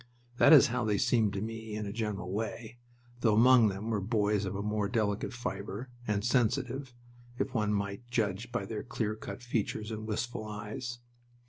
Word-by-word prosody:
That - - +7
is 145 -4 +9
how 125 -2 0
they 105 -2 +1
seemed 110 0 +3
to 100 +1 -2
me, 110 -1 -5
in 105 0 -3
a 100 - -4
general 105 -5 -3
way, 110 +3 -4 0.4
though 110 -3 +3
among 120 0 +7
them 100 +3 -3
were 105 -3 0
boys 105 -1 +1
of 95 +1 -3
a 100 - -2
more 105 -1 0
delicate 105 -3 0
fiber, 120 0 -5 0.2
and 105 -1 0
sensitive, 125 +1 0 0.4
if 130 - -2
one 105 -3 +1
might 100 +3 -3
judge 115 0 -1
by 120 -5 -2
their 105 +1 -4
clear 110 -2 -2
cut 110 +3 -8
features 110 -2 -2
and 110 0 -5
wistful 110 +1 -3
eyes. 105 +4 -5
110 Hz, 185 wpm, -31 LUFS, 105-120 Hz, 0.4 s, is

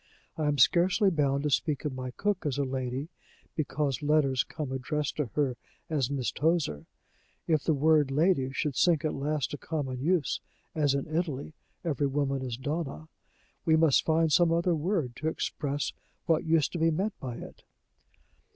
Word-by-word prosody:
I 155 -2 -1
am 145 -1 +1
scarcely 180 - +4
bound 140 -3 +1
to 150 - 0
speak 150 0 0
of 145 - -1
my 130 0 -5
cook 200 +8 -1
as 140 - -1
a 140 - +1
lady 130 +2 -3 0.5
because 140 -3 -1
letters 145 -3 +3
come 150 -5 -6
addressed 140 +3 -2
to 150 -4 0
her 135 -5 +1 0.3
as 140 -5 +1
Miss 135 -3 -1
Tozer. 150 - 0 0.6
If 155 -3 +2
the 160 - +3
word 150 0 +4
'lady' 140 -2 +2
should 140 0 -2
sink 165 0 +3
at 155 - 0
last 145 0 -1
to 145 - -5
common 135 -6 -3
use, 165 0 +1 0.3
as 145 -3 +2
in 140 - -1
Italy 155 -3 -2 0.3
every 145 -4 0
woman 135 -1 -1
is 125 -3 -4
Donna, 155 +3 -4 0.5
we 160 - +4
must 160 -3 +4
find 160 -1 +2
some 175 0 +5
other 170 +1 +2
word 160 - -1
to 155 - -3
ex - - -2
press 145 0 -2 0.3
what 165 -4 +2
used 160 -2 +2
to 175 - -4
be 165 +1 +4
meant 190 +7 0
by 125 -3 -5
it." - - -10
150 Hz, 180 wpm, -29 LUFS, 135-160 Hz, 0.6 s, some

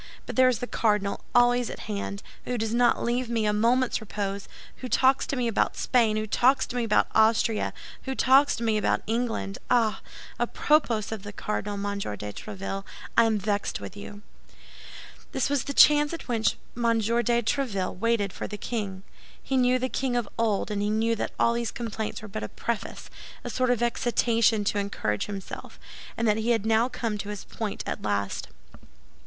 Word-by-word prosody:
But - - -6
there 255 0 +6
is 250 - +1
the 245 - -4
cardinal 210 -4 0
always 245 0 +4
at - - -7
hand, 200 -1 -4 0.2
who 250 - -2
does 225 0 -1
not 240 0 +3
leave 240 +1 0
me 225 -2 0
a 210 - +2
moment's 235 +4 +2
repose; 200 -2 -4 0.3
who 255 - -6
talks 265 +2 +3
to - - -1
me 250 -2 0
about 225 - 0
Spain, 225 -4 +2
who 215 - -1
talks 250 +5 +3
to - - -8
me 245 - 0
about 215 -2 +3
Austria, 220 0 +3 0.3
who 265 0 -2
talks 270 +3 +5
to 235 - -5
me 220 -2 +2
about - - +1
England! 225 - -2
Ah! 230 -3 +2 0.4
à - - 0
propos 240 -9 +2
of 220 -3 -4
the 205 +1 -7
cardinal, 205 0 -3
Monsieur 200 - -3
de 105 0 -6
Tréville, 195 - -5 0.3
I 230 - +6
am 220 -1 +2
vexed 205 0 -1
with 195 - -8
you!" 205 0 -9 1.1
This 265 +1 0
was 285 -3 +1
the - - -3
chance 295 +2 +6
at 335 - -7
which 225 -5 +1 0.2
M. 240 - -5 0.2
de 235 +2 +1
Tréville 215 -7 -1
waited 225 -3 +1
for - - -5
the 210 - -6
king. 200 -5 -4 0.4
He 270 - -2
knew 250 0 +4
the 255 +1 -1
king 260 -1 -1
of 240 -3 0
old, 220 -2 0
and 205 -1 -1
he 205 - 0
knew 225 +2 +1
that - - -2
all 235 - +4
these 235 -1 -1
complaints 220 -2 -4
were - - -6
but 195 - -5
a 110 - -4
preface—a 235 -2 -6
sort 255 -1 +1
of 240 -1 +2
excitation 230 -2 +2
to 205 0 0
encourage 110 - -2
himself—and 205 +3 -7
that 210 0 +3
he 220 +2 -1
had 225 -3 +2
now 225 +2 +3
come 225 -4 -3
to 205 - -5
his 205 -2 -5
point 220 -3 -5
at - - -4
last. 100 -1 -2
225 Hz, 195 wpm, -27 LUFS, 205-245 Hz, 1.1 s, there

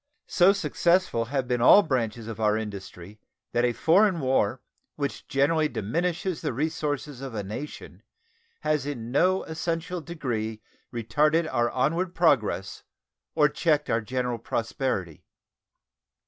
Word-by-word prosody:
So 180 +2 +5
successful 180 - +1
have 130 +1 -2
been 125 -1 0
all 200 +11 +8
branches 115 - -2
of 115 -1 -6
our 105 -1 +2
industry 100 -2 -8 0.3
that 120 - +1
a 125 - +3
foreign 175 - +3
war, 130 -3 +1 0.4
which 140 -1 -4
generally 150 +2 +2
diminishes 170 - -2
the - - -2
resources 145 -1 -3
of 135 -4 -6
a 105 - -2
nation, 115 +10 -8 0.6
has 150 -2 0
in 120 -5 -5
no 185 +7 +3
essential 165 +2 -3
degree 115 -10 -4 0.3
retarded 150 +8 +1
our 120 -1 +2
onward 170 +8 0
progress 120 - +1 0.5
or 150 -2 +5
checked 150 0 0
our 115 - +2
general 125 +1 -2
prosperity. 115 - -3
135 Hz, 130 wpm, -26 LUFS, 115-160 Hz, 0.6 s, all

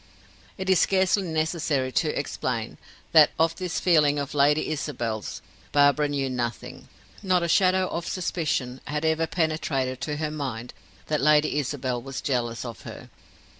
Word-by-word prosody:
It 190 - -5
is 190 -2 +4
scarcely 190 +1 +3
necessary 160 -5 -1
to - - 0
explain, - - -3 0.3
that 155 -3 +7
of 165 +1 +2
this 180 -2 -2
feeling 150 -5 +3
of 140 -1 -3
Lady 145 +1 +3
Isabel's 120 -8 -4 0.3
Barbara 145 +1 +4
knew 140 -2 -1
nothing; 120 -3 -5 0.3
not 185 -3 +2
a - - 0
shadow 185 +1 +3
of 170 -1 -4
suspicion 150 -8 -2
had 150 +1 -2
ever 160 0 +1
penetrated 150 -6 -1
to 150 - -2
her 155 0 -2
mind 130 -6 -5 0.3
that 150 -1 -1
Lady 150 0 +3
Isabel 130 -3 -2
was 135 +1 -6
jealous 120 -4 -2
of 115 -2 -8
her. - - -10
150 Hz, 150 wpm, -25 LUFS, 130-165 Hz, 0.3 s, that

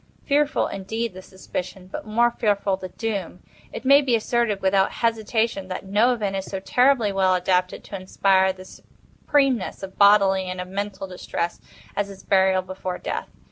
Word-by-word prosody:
Fearful 290 +1 +2
indeed 220 +3 -4
the 185 - -9
suspicion—but 185 +1 -7
more 235 +3 +3
fearful 205 -4 0
the 185 -1 -8
doom! 200 -5 -4 0.3
It 235 - -8
may 280 +2 +7
be 260 -4 +2
asserted, 230 -2 0
without 190 0 +2
hesitation, 225 -3 0
that 185 +1 -6
no 210 +6 +3
event 205 -5 -2
is 190 0 -3
so 195 - -5
terribly 245 +1 +3
well 190 -1 +2
adapted 180 0 0
to 200 - -7
inspire 190 0 +2
the 185 0 -12
supremeness 260 0 -2
of 190 0 -9
bodily 200 -2 +5
and 185 0 -5
of 180 0 -5
mental 195 0 -4
distress, 180 -2 -4 0.3
as 200 0 -1
is 195 -1 -12
burial 190 -1 +3
before 185 0 -5
death. - - -4
195 Hz, 165 wpm, -23 LUFS, 185-225 Hz, 0.3 s, may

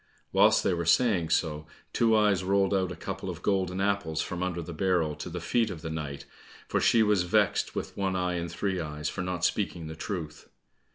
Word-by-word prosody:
Whilst - - +5
they - - +2
were 85 0 -1
saying 95 -6 +3
so, 75 -2 0 0.3
Two 115 -1 +3
eyes 105 -3 +3
rolled 100 +1 +2
out 95 -2 +1
a - - -5
couple - - -5
of - - -7
golden 95 -2 0
apples 100 -6 0
from 90 +1 -3
under 90 -2 -2
the 85 - -7
barrel 85 -3 +1
to - - -6
the 90 +1 -5
feet 115 +6 +1
of 85 -4 -7
the 80 - -4
knight, 70 -3 -5 0.4
for - - 0
she 115 - +5
was 105 -3 +3
vexed 90 - +1
with - - -4
One 95 -1 -1
eye 90 -1 0
and 85 -1 -3
Three 95 +1 -2
eyes, 75 -2 -3
for 95 - -4
not 90 -2 -1
speaking 90 -5 -1
the 80 0 -7
truth. 80 -3 -6
90 Hz, 215 wpm, -28 LUFS, 80-100 Hz, 0.4 s, Whilst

